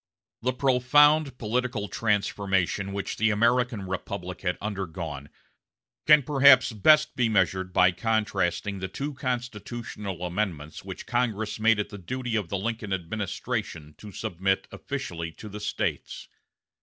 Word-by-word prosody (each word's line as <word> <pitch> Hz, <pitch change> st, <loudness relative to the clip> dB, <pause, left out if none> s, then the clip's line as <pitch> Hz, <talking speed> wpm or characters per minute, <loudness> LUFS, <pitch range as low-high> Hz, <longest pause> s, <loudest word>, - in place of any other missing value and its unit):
The 130 Hz, +2 st, 0 dB
profound 140 Hz, +3 st, +4 dB
political 115 Hz, -1 st, -1 dB
transformation 100 Hz, -2 st, 0 dB
which 100 Hz, 0 st, -4 dB
the 110 Hz, +1 st, +3 dB
American 115 Hz, +1 st, +2 dB
Republic 95 Hz, -1 st, -5 dB
had 90 Hz, -1 st, -1 dB
undergone 85 Hz, -8 st, -5 dB, 0.8 s
can 150 Hz, -2 st, +7 dB
perhaps 135 Hz, -2 st, +6 dB
best 150 Hz, +8 st, +4 dB
be 120 Hz, -3 st, +2 dB
measured 95 Hz, -3 st, +1 dB
by 90 Hz, 0 st, +5 dB
contrasting 100 Hz, -1 st, -1 dB
the 95 Hz, -, -3 dB
two 140 Hz, +10 st, -5 dB
constitutional 120 Hz, -6 st, -5 dB
amendments 85 Hz, -5 st, -3 dB
which -, -, -8 dB
Congress 110 Hz, -3 st, -1 dB
made 110 Hz, 0 st, +4 dB
it 105 Hz, -, -2 dB
the 105 Hz, -, -9 dB
duty 125 Hz, +5 st, -3 dB
of 105 Hz, -6 st, -1 dB
the 100 Hz, -, -1 dB
Lincoln 110 Hz, 0 st, -3 dB
administration 95 Hz, -2 st, -4 dB
to 105 Hz, -, -10 dB
submit 95 Hz, -1 st, -1 dB
officially 85 Hz, -1 st, -5 dB
to 110 Hz, -, -10 dB
the 105 Hz, 0 st, -7 dB
States. 105 Hz, -, -3 dB
105 Hz, 130 wpm, -27 LUFS, 95-120 Hz, 0.8 s, can